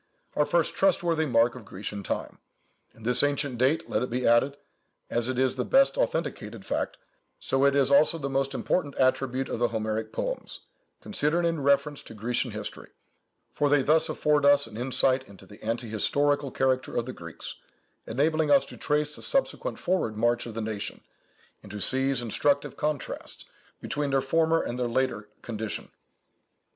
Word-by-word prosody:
our 150 - +2
first 170 -2 +1
trustworthy 170 -4 +2
mark 120 -1 +3
of 125 - -10
Grecian 100 +1 -6
time; 95 - -4 0.6
and 110 - -14
this 125 0 +4
ancient 145 -3 0
date, 135 +6 +2
let - - 0
it 125 - -2
be 125 +1 -2
added, 125 +5 +3 0.5
as 120 +1 0
it 130 - -2
is 130 0 +2
the 125 - 0
best 270 - +4
authenticated - - -2
fact, - - -2 0.4
so 135 +1 +1
it 140 0 +4
is 140 -1 +3
also 150 +4 +5
the 140 -3 -3
most 135 0 -1
important 145 -2 -1
attribute 130 0 +1
of - - -4
the 120 - +3
Homeric 110 -1 -3
poems, - - -4 0.4
considered 170 -3 0
in 165 -3 0
reference 140 +1 +2
to 115 - -12
Grecian 120 +4 -1
history; 105 -1 -7 0.6
for 145 - +1
they 145 -2 +4
thus 160 +3 +3
afford 150 -1 +1
us 145 0 +5
an 110 - -12
insight 130 +2 +1
into 95 -1 -15
the 105 +2 -15
anti 115 +2 -2
historical 145 +6 +1
character 130 0 0
of 120 - 0
the 130 - -6
Greeks, 85 -1 -8 0.5
enabling 155 +6 +1
us 140 -1 +5
to - - -11
trace 150 0 0
the - - -4
subsequent - - 0
forward 175 - -1
march 120 +2 +1
of 115 - -8
the 115 - -2
nation, 110 -2 -4 0.6
and 100 - -12
to 105 - -6
seize 135 +3 +3
instructive 140 +5 0
contrasts 150 -2 -4 0.3
between 145 0 -2
their 135 0 +2
former 165 +3 +2
and 125 - -4
their 125 - 0
later 115 -4 -1
condition." 110 -2 -4
135 Hz, 175 wpm, -27 LUFS, 115-145 Hz, 0.6 s, also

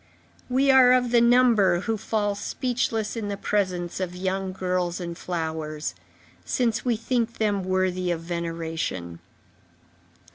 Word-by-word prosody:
We 270 +2 +4
are 255 -1 +7
of 250 -2 +2
the 240 -1 +5
number 235 -7 +4
who 225 +2 -1
fall 210 -1 -1
speechless 225 0 -2
in 220 -3 -3
the 200 -1 -3
presence 185 -5 -1
of 180 -1 -3
young 190 +1 -2
girls 180 -1 -1
and 170 -1 -5
flowers, 160 - -4 0.5
since 235 - 0
we 245 -2 +1
think 230 0 -1
them 205 -3 0
worthy 185 -1 0
of 170 -2 -1
veneration. 165 - -4
190 Hz, 135 wpm, -25 LUFS, 175-230 Hz, 0.5 s, are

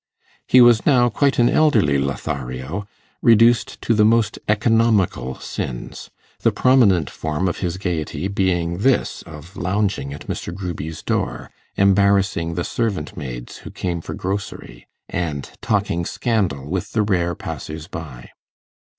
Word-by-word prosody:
He 130 - +6
was 120 -2 +6
now 125 -4 +4
quite 140 +4 +1
an 120 - +5
elderly 120 - +3
Lothario, 70 +5 -4 0.3
reduced 115 0 +4
to 115 - +2
the 105 -1 +4
most 110 -1 +2
economical 105 - +2
sins; - - -6 0.3
the - - +2
prominent 105 - +4
form 80 +6 -2
of 90 - -2
his 90 -2 -2
gaiety 90 -1 -3
being 90 -3 0
this 130 +5 +1
of 80 +3 -11
lounging 95 -5 -1
at 75 - -8
Mr. - - -4
Gruby's 85 -4 -6
door, - - -2 0.2
embarrassing 100 -4 +2
the 85 - -1
servant 100 -10 -2
maids - - -7
who - - -10
came 85 -2 -3
for - - -6
grocery, 95 -11 -5 0.2
and 75 -6 -3
talking 100 -5 0
scandal 90 - -1
with 90 +3 -3
the 110 - +2
rare 90 -4 0
passers 80 +1 -7
by. 75 -10 -9
90 Hz, 135 wpm, -21 LUFS, 75-105 Hz, 0.3 s, He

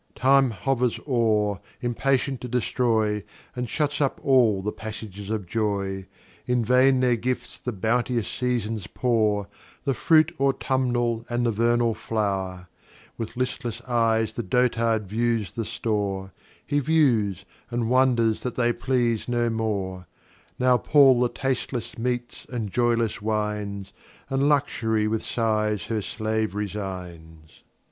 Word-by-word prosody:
Time 135 0 +4
hovers 125 +2 0
o'er, 110 -6 +2 0.2
impatient 130 +2 0
to 125 - -5
destroy, 115 -4 +1 0.3
And 125 -2 -3
shuts 150 +1 -1
up 140 - 0
all 120 -8 +4
the 105 - -1
Passages 105 -2 -7
of 110 -3 -2
Joy: 100 -2 -2 0.4
In 125 -2 +1
vain 130 +2 +4
their 125 -1 +3
Gifts 125 +2 -3
the 125 - -3
bounteous 115 +2 0
Seasons 115 -5 -2
pour, 110 -5 +1 0.4
The 135 - +2
Fruit 155 +7 +4
Autumnal, 125 -4 +1
and 120 0 0
the 115 - +2
Vernal 115 +1 +2
Flow'r, 95 -4 -2 0.5
With 115 +1 -6
listless 125 -2 -2
Eyes 115 -3 +1
the 120 - -3
Dotard 115 -3 +1
views 115 -1 0
the 115 - -4
Store, 100 -4 -2 0.3
He 145 +1 +1
views, 120 - +2 0.2
and 120 -2 -1
wonders 120 -3 +3
that 125 - -4
they 120 -1 +2
please 120 -4 0
no 120 -1 +1
more; 100 -5 -2 0.5
Now 125 0 +4
pall 135 -4 +5
the 125 - +3
tastless 130 -2 -3
Meats, 120 0 -3
and 115 -5 -4
joyless 115 -2 +1
Wines, 105 -2 -2 0.4
And 135 +2 +2
Luxury 110 -7 +1
with 110 0 -1
Sighs 105 -4 0
her 110 -2 -2
Slave 110 +2 -2
resigns. 90 -6 -6
115 Hz, 130 wpm, -25 LUFS, 105-125 Hz, 0.5 s, pall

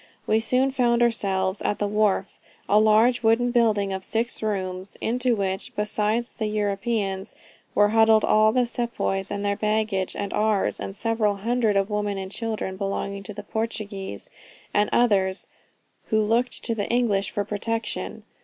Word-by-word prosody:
We 220 - +3
soon 255 +4 +1
found 240 -2 +2
ourselves 195 -4 0
at 205 - 0
the 205 - -1
wharf, 205 -2 0 0.3
a 210 - +5
large 220 +3 +4
wooden 235 +2 +3
building 215 -5 +2
of 190 0 -4
six 230 +3 -2
rooms, 190 -3 -3
into 245 +1 +1
which, 195 -2 -3
besides 210 +3 0
the 220 - -3
Europeans, 205 -1 -2 0.4
were 205 0 +5
huddled 220 0 +5
all 215 0 +4
the 250 +1 +2
sepoys 235 -5 -2
with 200 - -3
their 200 0 +1
baggage 210 -3 -1
and 200 -1 -4
ours, 210 -2 +1
and 195 - -5
several 220 -1 0
hundreds 225 0 +1
of 195 +2 0
women 205 -1 -1
and 190 0 -5
children 215 -4 -3
belonging 200 0 -3
to 200 +1 -9
Portuguese 205 - -5 0.4
and 205 0 +2
others, 200 -5 +2 0.6
who 220 - +1
looked 230 +4 0
to 230 - -1
the 205 -3 -3
English 220 -5 +1
for 205 - -2
protection. 225 +3 -3
210 Hz, 155 wpm, -24 LUFS, 200-230 Hz, 0.6 s, a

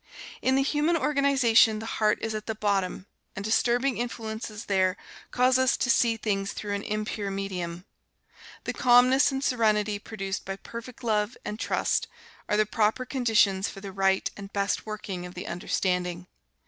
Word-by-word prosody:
In 260 - +2
the 270 - +3
human 300 +4 +1
organization 275 -7 +4
the 220 - -6 0.2
heart 210 0 +4
is 225 -1 -1
at 215 0 -5
the 220 - -2
bottom, 195 -3 -1 0.3
and 195 - -5
disturbing 240 +4 +1
influences 220 -2 -5
there 185 -2 +1 0.3
cause 255 +1 +3
us 260 0 +3
to 260 - +2
see 230 -3 +3
things 200 -3 -2
through 205 -1 -4
an 200 - -2
impure 210 -1 -3
medium. 185 -3 -4 0.8
The - - -3
calmness 255 +3 +5
and 270 0 -3
serenity, 215 -5 +1
produced 195 -2 -5
by 195 - -4
perfect 235 +5 -10
love 215 +1 0
and 210 +1 -5
trust, - - 0 0.4
are 210 - +2
the 215 - +4
proper 215 +4 0
conditions 225 -7 +2
for - - -9
the 195 0 -7
right 195 0 +1
and 200 -1 -9
best 200 +2 -1
working 195 -4 -5
of 180 - -13
the - - -6
understanding. 180 0 -2
215 Hz, 165 wpm, -27 LUFS, 195-245 Hz, 0.8 s, calmness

